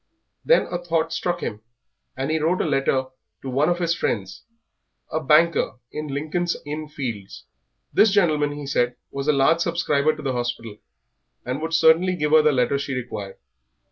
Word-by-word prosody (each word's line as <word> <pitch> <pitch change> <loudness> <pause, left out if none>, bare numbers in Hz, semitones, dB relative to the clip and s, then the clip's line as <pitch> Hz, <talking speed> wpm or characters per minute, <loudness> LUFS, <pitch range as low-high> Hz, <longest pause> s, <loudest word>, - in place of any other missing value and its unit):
Then - - +4
a 175 - -2
thought 165 -1 0
struck 175 -1 -2
him, 105 -1 -4 0.6
and 135 +3 -2
he 160 - +1
wrote 165 +4 +1
a - - 0
letter 135 -3 0 0.3
to 135 - -5
one 140 +6 +2
of 175 - +1
his 170 -1 0
friends, 95 - -3 0.7
a 160 - 0
banker 160 +2 +3 0.2
in 150 0 -5
Lincoln's 155 +5 -2
Inn 150 +1 -5
Fields. 115 -10 -6 0.5
This 220 - +5
gentleman, 155 -7 +2
he 145 0 -7
said, 125 -2 0 0.2
was 140 +1 -4
a - - +6
large 150 +4 +3
subscriber 155 -3 +1
to 155 - -10
the 135 -2 -1
hospital, 120 -3 -4 0.7
and 130 +4 -3
would 165 +1 -1
certainly 165 +4 +4
give 150 -3 -1
her 155 0 +7
the 150 0 +4
letter 130 +1 +1
she 140 -1 -3
required. 105 -6 -6
150 Hz, 175 wpm, -23 LUFS, 130-165 Hz, 0.7 s, her